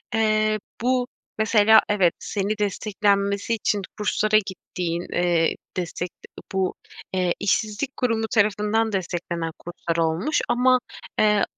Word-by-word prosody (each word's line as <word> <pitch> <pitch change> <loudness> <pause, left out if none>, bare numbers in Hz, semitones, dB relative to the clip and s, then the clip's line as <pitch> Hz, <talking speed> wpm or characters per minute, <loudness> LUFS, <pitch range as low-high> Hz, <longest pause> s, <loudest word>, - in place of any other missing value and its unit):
eee, 215 -1 +2 0.2
bu, 250 0 +1 0.3
mesela 220 0 +6
evet 195 -5 +3
seni 205 +1 -2
desteklenmesi 200 0 0
için 210 -2 0 0.2
kurslara 215 0 +2
gittiğin, 175 -2 -4
eee, 175 -2 +2 0.2
destek 180 0 -3
de - - -18 0.3
bu, 190 -1 0 0.4
eee, 180 -2 +1
işsizlik 215 +6 -1
kurumu 225 -3 0
tarafından 210 +1 +2
desteklenen 175 -3 -3
kurslar 170 -1 -4
olmuş. 165 - 0
Ama, 255 +1 +4 0.4
eee, 210 -1 +4
205 Hz, 115 wpm, -24 LUFS, 180-220 Hz, 0.4 s, mesela